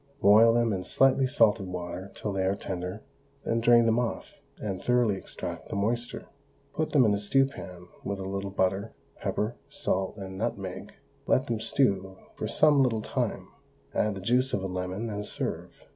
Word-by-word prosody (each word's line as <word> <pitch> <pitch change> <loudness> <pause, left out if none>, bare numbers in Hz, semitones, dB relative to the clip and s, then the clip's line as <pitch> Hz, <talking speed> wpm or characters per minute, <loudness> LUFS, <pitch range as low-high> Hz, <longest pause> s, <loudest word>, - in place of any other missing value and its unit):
Boil 110 +3 +7
them 115 -2 +2
in 95 -1 -2
slightly 135 +6 +3
salted 105 -5 +3
water 90 +1 -6
till 105 - -3
they 95 -1 0
are 95 +1 +1
tender, 90 +1 -5 0.4
then 115 - +1
drain 120 0 +6
them 115 +1 +3
off, 120 -2 -3 0.3
and 95 -3 -4
thoroughly 120 -4 +2
extract - - -7
the - - -4
moisture; 115 +4 -2 0.5
put 155 - -1
them 135 -5 +5
in 105 - +3
a 100 - 0
stew 135 +7 +3
pan 90 -9 -9 0.2
with 100 0 -3
a 95 - -5
little 100 0 -3
butter, 95 +2 0 0.2
pepper, 110 +3 -2
salt, 95 +2 -2
and 95 -1 -7
nutmeg, 100 -5 -4 0.3
let 130 - +3
them 115 -2 -2
stew 95 -6 0 0.2
for - - -3
some 150 -2 +4
little 115 -5 +1
time; - - -2 0.4
add 105 -1 +1
the 95 - -6
juice 125 +6 +2
of 95 - 0
a - - -1
lemon, 90 +4 -3
and 105 -2 -4
serve. - - -4
105 Hz, 180 wpm, -28 LUFS, 95-120 Hz, 0.5 s, Boil